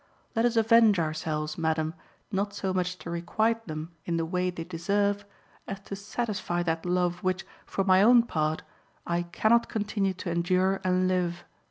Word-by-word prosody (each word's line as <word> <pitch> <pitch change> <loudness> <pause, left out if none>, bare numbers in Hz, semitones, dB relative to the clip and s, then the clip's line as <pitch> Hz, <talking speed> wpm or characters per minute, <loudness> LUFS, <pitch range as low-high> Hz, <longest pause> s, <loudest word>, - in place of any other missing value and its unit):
Let 225 +1 +3
us 240 -1 +1
avenge 225 -2 +6
ourselves, 155 -1 -2
madam, 160 -1 0 0.4
not 200 0 -1
so 190 -2 -2
much 180 0 -1
to 170 - -7
requite 220 +7 0
them 155 +1 -5 0.2
in 170 -1 0
the 165 - 0
way 180 +2 0
they 175 -2 -5
deserve 200 +4 0 0.4
as 195 - -5
to 200 - -6
satisfy 200 -4 -2
that 165 0 -2
love 180 0 +1
which, 185 0 0 0.2
for 195 - -1
my 190 0 +5
own 235 +3 +7
part, 155 -7 -1 0.4
I 170 0 0
cannot 215 +7 +2
continue 205 -3 -1
to 175 -1 -4
endure 185 +3 +1
and 185 0 +2
live. 175 -1 0
185 Hz, 170 wpm, -28 LUFS, 170-205 Hz, 0.4 s, own